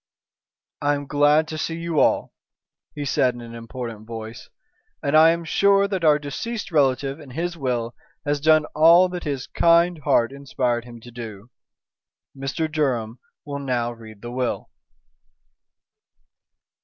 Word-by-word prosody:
"I 145 0 +2
am 145 0 -5
glad 145 +2 +3
to 155 - -5
see 165 - -2
you 165 -2 -1
all," - - +2 0.6
he 145 -1 -4
said 130 -2 +2
in 120 - -9
an 115 0 -10
important 115 -2 -7
voice, 115 0 -8 0.5
"and 140 +2 +1
I 160 +1 +8
am 170 0 0
sure 200 +3 +3
that 190 -3 -3
our 150 -2 +5
deceased 185 +10 -5
relative 135 -1 +1
in 145 -3 -12
his 170 +6 -3
will 125 -6 -2 0.3
has 145 -1 0
done 155 0 +4
all 170 +4 +6
that 180 -1 -6
his 140 -3 -3
kind 170 0 +3
heart 120 -3 +2
inspired 130 -4 -2
him 120 -1 -12
to 120 - -12
do. 115 -1 -9 0.8
Mr. 135 +4 -2
Durham 130 -7 -1 0.3
will 140 -1 -5
now 125 -4 -1
read 110 -3 -13
the 120 - -6
will." 125 0 -3
140 Hz, 150 wpm, -23 LUFS, 120-160 Hz, 0.8 s, I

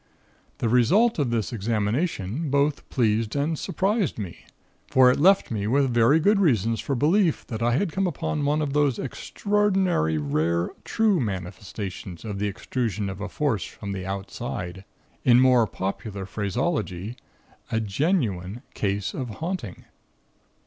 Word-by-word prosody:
"The - - -1
result 165 - +4
of 140 -4 +1
this 115 -1 -1
examination, 115 - -1
both 140 +1 +1
pleased 110 -2 +1
and 145 +3 0
surprised 195 - 0
me, 95 -6 -7 0.4
for 130 -1 +6
it - - 0
left 190 +1 +4
me 105 -2 -1
with 135 +1 +2
very 120 +7 +5
good 200 +5 +3
reasons 115 - +2
for 140 - -2
belief 165 - +2
that 110 -1 -5
I 120 +1 +2
had 165 +7 +1
come 190 +3 0
upon 160 -3 -2
one 150 +2 +1
of 140 -2 -2
those 145 -4 +2
extraordinary 190 - 0
rare 80 +4 0
'true 215 -5 +2
manifestations' 95 - -5
of 105 -2 -4
the 105 - 0
extrusion 105 -1 -2
of 95 +1 -8
a 105 - -4
Force 120 - -1
from 100 -2 -7
the 95 -1 -4
Outside. 95 -1 -5 0.4
In 120 -1 +6
more 125 -3 +5
popular 100 +1 -4
phraseology 105 - -2 0.6
a 115 - +1
genuine 110 - -1
case 100 -1 -1
of 130 -3 -4
haunting. 145 - -5
120 Hz, 145 wpm, -25 LUFS, 100-150 Hz, 0.6 s, for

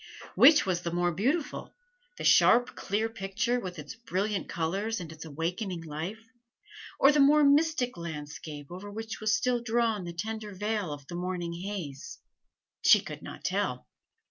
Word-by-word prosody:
Which 300 -5 +7
was 180 -2 0
the 170 - -3
more 175 +1 +1
beautiful 270 - -2 0.4
the - - -6
sharp, 245 +1 +5
clear 215 +3 -1
picture, 225 +3 -1
with 185 -5 -6
its 150 -1 -7
brilliant 205 -3 -2
colors 195 +7 -2
and 165 -3 -7
its 160 0 -9
awakening 170 +4 -3
life, 165 +9 -6 0.7
or 275 - +7
the 295 - +2
more 295 +2 +6
mystic 285 -3 +3
landscape 150 -2 -7
over 190 +3 -8
which 220 +2 -6
was 215 -1 +3
still 250 -1 0
drawn 225 -4 0
the 170 - -6
tender 215 +3 -5
veil 210 -3 -2
of 145 -2 -7
the 175 - -10
morning 175 -1 -3
haze? 175 -6 -6 0.6
She - - +7
could - - -8
not - - -9
tell. - - -1
195 Hz, 160 wpm, -29 LUFS, 170-225 Hz, 0.7 s, Which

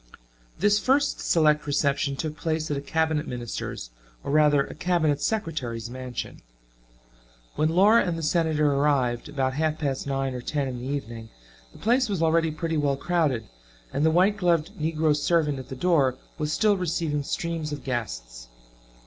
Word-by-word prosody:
This 205 +3 +3
first 275 +6 +2
select 150 -3 +2
reception 140 -1 +1
took 155 +2 -4
place 155 -1 -2
at - - 0
a - - -3
cabinet 160 +1 0
minister's 120 - -5 0.3
or - - -3
rather 150 -1 +4
a - - -9
cabinet 155 -3 +1
secretary's 125 - -2
mansion. 130 -1 -6 1.1
When 155 +1 +1
Laura 200 +7 +5
and 170 -2 -2
the 165 - -5
Senator 155 -2 +2
arrived, 140 -4 +1
about 135 -3 -1
half 155 +2 0
past 140 -3 -2
nine 135 -1 -1
or 125 - -5
ten 145 +2 -2
in 125 -2 -5
the 125 - -5
evening, 115 -5 -5 0.4
the - - -16
place 245 +2 +2
was 190 -5 -1
already 165 0 +3
pretty 160 +1 -2
well 140 -2 +1
crowded, 145 -9 0 0.5
and 140 - 0
the 160 - +5
white 185 +6 +3
gloved 170 -5 +1
negro 155 -1 +1
servant 150 -2 +1
at 130 - -10
the 130 - -5
door 135 -4 +2 0.2
was 150 0 -1
still 210 +5 +3
receiving 165 -4 -1
streams 165 +1 -3
of 145 - -6
guests. - - -5
150 Hz, 165 wpm, -26 LUFS, 135-165 Hz, 1.1 s, Laura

